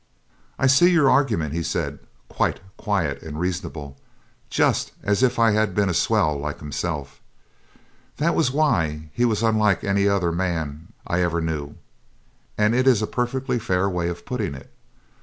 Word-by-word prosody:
'I - - +1
see 140 +7 +6
your 155 -6 +4
argument,' 110 - +1
he 85 - -1
said, - - -3 0.3
quite - - -1 0.2
quiet 80 -10 -1
and 80 -1 -7
reasonable, 85 -6 -4 0.5
just - - +1
as 100 +2 +1
if 125 -1 +2
I 115 -1 +4
had 105 -3 +1
been 100 -2 +2
a - - 0
swell 75 -2 +1
like 75 +1 -4
himself 75 -1 -5 1.0
that 165 +3 +1
was 155 - +2
why 80 - 0
he 120 - +1
was 110 -2 0
unlike 110 -4 +2
any 100 0 +2
other 95 -4 +1
man 80 -3 -3 0.2
I 90 +1 0
ever 85 -1 0
knew 75 -3 -3 0.8
'and 105 +1 +3
it 130 +2 +2
is 115 -5 +4
a - - +2
perfectly 125 +2 -2
fair 95 -2 0
way 90 -2 -1
of 85 0 -7
putting 110 - -3
it. 65 - -13
95 Hz, 165 wpm, -23 LUFS, 80-115 Hz, 1.0 s, see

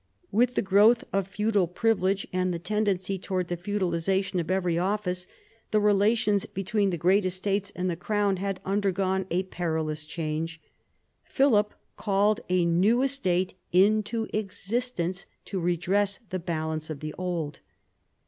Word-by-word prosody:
With 245 +4 +2
the - - +1
growth 205 +5 +5
of 195 -1 +1
feudal 205 -1 +1
privilege, 195 0 +1
and 185 0 +1
the 170 - -2
tendency 195 +1 -1
towards 185 -1 -2
the 175 - -1
feudalisation 190 0 -1
of 165 - -7
every 185 -2 +1
office, 180 0 -1 0.4
the 215 - +3
relations 210 0 +3
between 200 +1 0
the 175 - -2
great 185 +5 +3
estates 195 +2 -1
and 180 0 -1
the 175 - 0
crown 200 +2 0
had 195 0 -3
undergone 190 -1 0
a 180 +3 +1
perilous 160 -4 -2
change. 160 +1 -4 0.6
Philip 220 -7 +2 0.2
called 205 0 +2
a 180 -1 +3
new 195 +9 +3
estate 190 -10 0 0.2
into 215 +4 +3
existence 195 -2 -2 0.2
to 195 - -3
redress 180 +4 +1
the 185 - -1
balance 160 -2 -3
of 150 -3 -6
the 155 0 -5
old. 170 -5 -3
190 Hz, 140 wpm, -27 LUFS, 175-205 Hz, 0.6 s, growth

